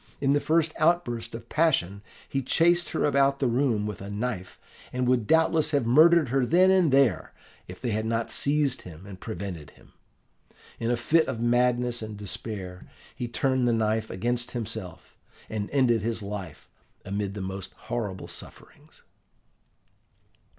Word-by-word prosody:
In 140 0 +2
the 145 - +3
first 160 +1 +1
outburst 155 -9 +1
of 115 0 -9
passion, 120 - +1 0.3
he 135 - -1
chased 170 +5 +2
her - - 0
about 140 -1 +3
the 140 - -1
room 120 -3 +1
with 105 -2 -5
a 100 - -7
knife, 105 -3 -4 0.3
and 125 0 -1
would 125 -4 +2
doubtless 160 -1 +3
have 145 -5 +1
murdered 155 +4 +5
her 135 +1 +2
then 180 +8 +4
and 185 -6 +4
there, 135 -8 +2 0.3
if - - -10
they 120 - -2
had 110 +1 -1
not 115 0 -1
seized 145 0 +1
him 90 +1 -12
and 100 -2 -10
prevented 90 -8 -6
him. - - -21 0.9
In 115 - -1
a 120 - +1
fit 160 +7 +2
of 115 - -3
madness 120 0 +1
and 110 -1 -6
despair 100 -3 -6 0.3
he 120 - -4
turned 130 +1 0
the 120 - +3
knife 110 0 0
against 120 +5 -2
himself, 110 -7 -6 0.3
and 105 -2 -3
ended 125 -5 +2
his 115 0 -2
life 100 -6 -7 0.4
amid 100 0 -3
the 100 - -5
most 95 0 -5
horrible 105 -6 -5
sufferings. - - -10
120 Hz, 160 wpm, -27 LUFS, 105-140 Hz, 0.9 s, murdered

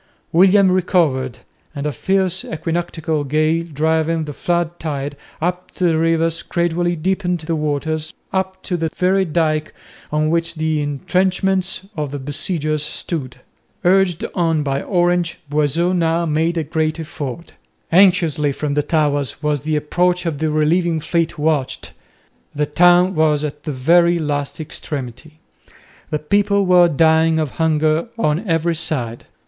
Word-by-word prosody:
William 190 +2 +5
recovered, 160 - +1 0.4
and 140 0 -4
a 150 - 0
fierce 190 +6 0
equinoctial 160 -2 -2
gale 155 +3 +1
driving 160 +2 +1
the 145 - -6
flood 175 +2 -1
tide 145 -2 -4 0.2
up 180 +2 -2
the 175 -3 +2
rivers 165 0 +1
gradually 175 0 0
deepened 180 +1 -1
the 165 +1 -2
waters 155 +1 -2 0.2
up 190 0 -2
to 180 - -2
the 165 -1 -1
very 190 +1 +2
dyke 155 -2 -1 0.4
on 155 +1 +1
which 170 0 -1
the 155 -1 0
entrenchments 185 +6 0
of 150 -3 -3
the 145 - -5
besiegers 150 +2 -2
stood. 140 -4 -5 0.4
Urged 190 +2 +3
on 165 -4 +1
by 140 -1 -1
Orange, 175 -2 +1
Boisot 150 +5 +1
now 170 0 +1
made 165 +2 0
a 165 - 0
great 155 +1 -1
effort. 150 -1 -6 0.4
Anxiously 165 -5 +4
from 145 +1 -3
the 150 - +2
towers 145 -1 0
was 150 -2 0
the 155 +1 -1
approach 175 +4 +1
of 155 -4 -2
the 160 0 0
relieving 160 +2 +1
fleet 165 +1 -1
watched. 150 -3 -1 0.6
The 150 +1 +1
town 175 +4 +4
was 155 -3 +2
at 150 -1 -5
the 155 - -2
very 170 +6 +3
last 145 -3 -3
extremity. 150 -1 -6 0.8
The 150 - 0
people 200 +6 +1
were 180 -1 +6
dying 160 +1 +3
of 155 -4 -1
hunger 155 +2 +2
on 180 -1 0
every 165 0 +1
side. 125 -8 -3
160 Hz, 145 wpm, -19 LUFS, 150-175 Hz, 0.8 s, were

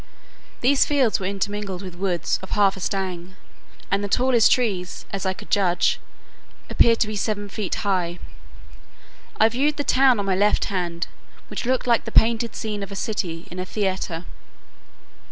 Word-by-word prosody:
These 265 +3 +4
fields 270 -6 +2
were 185 - -2
intermingled 200 -1 -3
with 185 -2 -7
woods 180 -1 -1
of 190 - -9
half 200 -2 +3
a - - -9
stang, 185 -1 -3 0.6
and 200 +1 +1
the - - -1
tallest 245 +1 +4
trees, 195 -8 0
as 195 -1 -2
I 190 - +1
could 205 +2 -13
judge, 180 -3 +2 0.7
appeared 230 -1 +5
to 220 - +3
be 215 - -4
seven 205 0 -2
feet 200 -1 -3
high. 180 -3 0 1.2
I 220 - +7
viewed 280 +6 0
the 290 - -1
town 260 -4 +4
on 200 - -1
my 190 -1 +1
left 205 +2 +2
hand, 175 -3 -2 0.4
which - - -4
looked 260 0 +1
like 235 -2 +2
the 225 - -5
painted 230 +1 +3
scene 210 -2 -4
of 200 0 -6
a - - -6
city 185 -6 -3
in 180 - -6
a - - -1
theatre. 185 -4 -2
200 Hz, 170 wpm, -23 LUFS, 185-225 Hz, 1.2 s, I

